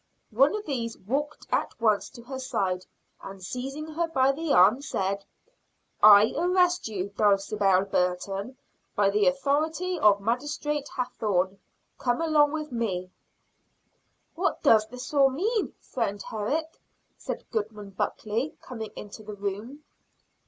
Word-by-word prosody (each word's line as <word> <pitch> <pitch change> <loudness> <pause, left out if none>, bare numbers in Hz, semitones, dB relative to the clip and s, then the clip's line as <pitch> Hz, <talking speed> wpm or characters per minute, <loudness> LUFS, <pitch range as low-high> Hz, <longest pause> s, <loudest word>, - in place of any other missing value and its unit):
One 270 - +4
of 425 0 -5
these 235 -5 -3
walked 285 +9 -3
at - - -1
once 215 -3 +2
to 235 - -13
her 265 +2 -6
side, 185 -8 -2 0.3
and 195 -1 -9
seizing 270 +9 -5
her 330 +2 -1
by 270 -4 +3
the 310 +2 -3
arm 210 +7 +6
said, 195 -7 -2 0.8
"I 210 0 +8
arrest 360 -1 +2
you, 200 -3 -3
Dulcibel 200 -1 +2
Burton, 195 +5 -1 0.4
by 200 -1 +3
the 205 0 +3
authority 310 +6 0
of 205 -6 +5
Magistrate 290 +6 -2
Hathorne. 195 -6 -1 0.4
Come 245 -1 0
along 305 -3 +3
with 305 -2 -4
me." 190 -7 -2 1.2
"What 370 +3 -1
does 215 -1 +6 0.3
all 275 -2 +5
this 260 - -6
mean, 430 - 0
friend 205 -5 -3
Herrick?" 280 +12 -3 0.3
said - - -6
Goodman 210 -2 -4
Buckley, 220 +7 -2
coming 225 -4 -7
into 210 +1 -9
the 210 -1 -8
room. 205 +9 -5
230 Hz, 130 wpm, -27 LUFS, 200-295 Hz, 1.2 s, I